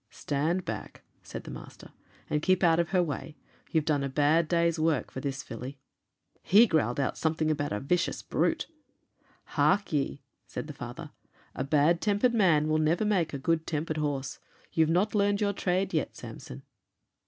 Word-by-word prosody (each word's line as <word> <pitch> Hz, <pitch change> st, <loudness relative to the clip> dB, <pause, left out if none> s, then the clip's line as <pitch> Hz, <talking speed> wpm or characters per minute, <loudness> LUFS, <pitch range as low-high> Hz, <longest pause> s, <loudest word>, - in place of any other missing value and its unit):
'Stand 160 Hz, +6 st, -1 dB
back,' -, -, -6 dB, 0.2 s
said -, -, -8 dB
the -, -, -8 dB
master, -, -, -11 dB, 0.4 s
'and 150 Hz, -, 0 dB
keep 185 Hz, +3 st, +2 dB
out 165 Hz, -1 st, +5 dB
of 170 Hz, -, +1 dB
her 185 Hz, -2 st, +3 dB
way; 155 Hz, -1 st, -5 dB, 0.3 s
you've 160 Hz, -2 st, +1 dB
done 145 Hz, -3 st, +1 dB
a 140 Hz, -, -2 dB
bad 150 Hz, +4 st, +3 dB
day's 170 Hz, 0 st, +1 dB
work 155 Hz, -4 st, +1 dB
for -, -, -5 dB
this 135 Hz, 0 st, -4 dB
filly.' 125 Hz, +4 st, -7 dB, 0.6 s
He 210 Hz, +7 st, +6 dB
growled 155 Hz, -, +1 dB
out 135 Hz, -, -1 dB
something 160 Hz, -1 st, +1 dB
about 145 Hz, -1 st, -2 dB
a 105 Hz, -, -1 dB
vicious 175 Hz, +8 st, -1 dB
brute. -, -, 0 dB, 0.8 s
'Hark 200 Hz, -4 st, +1 dB
ye,' 140 Hz, -1 st, -1 dB, 0.2 s
said -, -, -5 dB
the -, -, -8 dB
father, -, -, -8 dB, 0.4 s
'a 130 Hz, -, -3 dB
bad 155 Hz, +4 st, +3 dB
tempered 210 Hz, +4 st, +2 dB
man 170 Hz, -9 st, +4 dB
will 155 Hz, 0 st, +2 dB
never 165 Hz, +7 st, +2 dB
make 180 Hz, -7 st, +1 dB
a 140 Hz, -, -3 dB
good 160 Hz, +3 st, 0 dB
tempered 155 Hz, 0 st, -2 dB
horse. 140 Hz, -3 st, -2 dB, 0.3 s
You've 160 Hz, -1 st, +3 dB
not 185 Hz, +6 st, +2 dB
learned 205 Hz, -1 st, +2 dB
your 205 Hz, -1 st, +1 dB
trade 185 Hz, 0 st, 0 dB
yet, 155 Hz, -, -1 dB
Samson.' 65 Hz, +2 st, -9 dB
160 Hz, 175 wpm, -29 LUFS, 145-180 Hz, 0.8 s, He